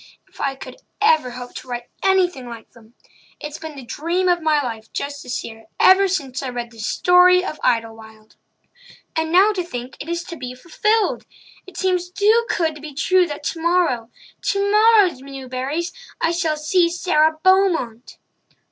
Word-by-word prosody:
If - - -13
I 275 -1 -1
could - - -10 0.2
ever 315 - +3
hope 245 0 -9
to - - -10
write 245 -1 -5
anything 360 -9 +1
like 235 -2 -10
them! 230 0 -20 0.4
It's 295 0 -7
been 315 -2 -8
the 270 -3 -10
dream 340 +8 -1
of 350 -1 +2
my 310 -2 +2
life 225 -5 -5
just 285 0 -4
to - - -12
see 245 - -3
her 225 0 -14
ever 390 +1 +6
since 275 -8 -3
I 270 - -4
read 240 -1 -5
The 230 - -16
Story 360 +9 +4
of 310 - -5
Idlewild. 220 -1 -3 0.8
And 320 0 -1
now 385 +5 +5
to 365 -3 -2
think 250 -6 -8
that 295 - -7
it - - -7
is 340 0 -2
to 340 - -8
be 250 -4 -7
fulfilled! 420 - 0 0.4
It 370 -2 -12
seems 365 -2 0
too 430 +5 +2
good 325 -2 0
to 300 - -12
be 300 -2 -9
true 360 +4 +3
that 290 -2 -7
tomorrow—tomorrow, 365 - +2
Newburys,—I 275 - -4
shall 330 -3 -1
see 340 +3 +2
Sara 315 -3 +2
Beaumont!" 350 - +1
315 Hz, 170 wpm, -21 LUFS, 255-365 Hz, 0.8 s, ever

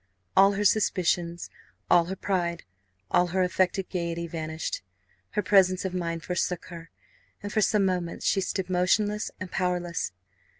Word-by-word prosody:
All 195 +1 +6
her 205 +1 -1
suspicions, 175 -4 +1 0.4
all 170 -1 +5
her 190 +3 -4
pride, 175 -3 -1 0.5
all 180 - +4
her 185 +1 +1
affected 185 +1 +1
gaiety 170 -2 -2
vanished; 160 - -4 0.5
her 210 - 0
presence 185 -2 +4
of 185 - -2
mind 170 -2 -3
forsook 180 -1 -2
her, 165 -1 -9 0.5
and 205 - -5
for 215 - +2
some 205 0 +3
moments 180 -2 -2
she 195 - +3
stood 190 0 -2
motionless 205 +4 +1
and 185 -1 -6
powerless. 175 - -1
180 Hz, 145 wpm, -27 LUFS, 170-195 Hz, 0.5 s, All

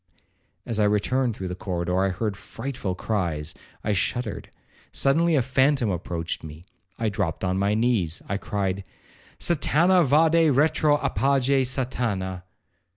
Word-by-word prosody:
As 115 -2 -2
I 105 - +4
returned 115 +4 +1
through 95 -3 -5
the - - -3
corridor, 90 -1 -2
I 95 - +2
heard 100 +2 -2
frightful 125 -3 -5
cries—I 90 0 -3
shuddered. 120 +5 -2 0.4
Suddenly 160 +4 +2
a 135 - +3
phantom 130 -2 +2
approached 85 -1 -4
me—I 90 +7 -7
dropt 85 -5 -2
on 95 0 0
my 100 +2 +2
knees—I 100 -5 0
cried, 100 -2 -2 0.6
'Satana 175 +2 +3
vade 160 +3 +4
retro—apage 140 -3 +2
Satana.' 110 -8 -2
110 Hz, 115 wpm, -25 LUFS, 95-135 Hz, 0.6 s, I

